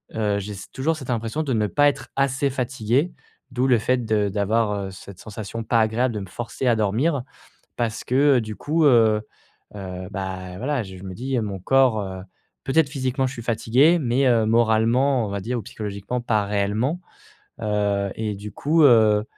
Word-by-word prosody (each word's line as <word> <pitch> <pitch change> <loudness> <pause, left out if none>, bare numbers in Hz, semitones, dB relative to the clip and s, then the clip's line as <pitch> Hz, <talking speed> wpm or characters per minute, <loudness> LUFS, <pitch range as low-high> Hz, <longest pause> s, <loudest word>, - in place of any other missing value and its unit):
heu, 105 -2 0
j'ai 105 +1 -6
s 100 -1 -10
toujours 155 +5 -1
cette 135 -5 -9
impression 115 +5 -1
de 140 - -3
ne 105 -2 +1
pas 145 +7 +4
être 145 - -6
assez 140 +1 +1
fatigué, 130 +4 0 0.4
d'où 125 +1 0
le 125 -2 +5
fait 125 +2 0
de 105 -2 +1
d'avoir, 105 +2 +1 0.2
heu, - - -8
cette 95 0 -12
sensation 110 +1 -6
pas 115 0 +3
agréable 115 +3 +1
de 105 - -3
me 95 - -7
forcer 120 +6 -5
à 120 -2 +3
dormir. 120 +8 +1 0.5
Parce 115 -2 -2
que, 125 - -3 0.2
heu, - - +2
du 110 -1 -7
coup, 160 +2 0
heu, 110 -6 +5 0.5
heu, 95 -2 -6
bah, 95 -1 -5
voilà, 130 +2 -1
je 95 -2 -10
me 95 -1 -7
dis, 130 +5 -3
heu, - - 0
mon 100 -3 -5
corps, 130 +1 +3
heu. 95 -1 -6 0.4
Peut-être 140 +1 +2
physiquement 130 -1 -1
je 130 - -4
suis 120 - -8
fatigué, 125 +8 +3
mais, 135 -1 +1
heu, 115 -3 +3
moralement, 115 +3 +3
on - - -5
va 100 0 -3
dire 120 +5 -3
ou - - -5
psychologiquement 105 +4 -5
pas 110 -3 0
réellement. 105 - -1 0.6
Heu 100 -2 0
et 110 -2 -3
du 105 +2 -8
coup, 155 +2 +2
heu, 110 -5 +5
115 Hz, 195 wpm, -23 LUFS, 105-130 Hz, 0.6 s, le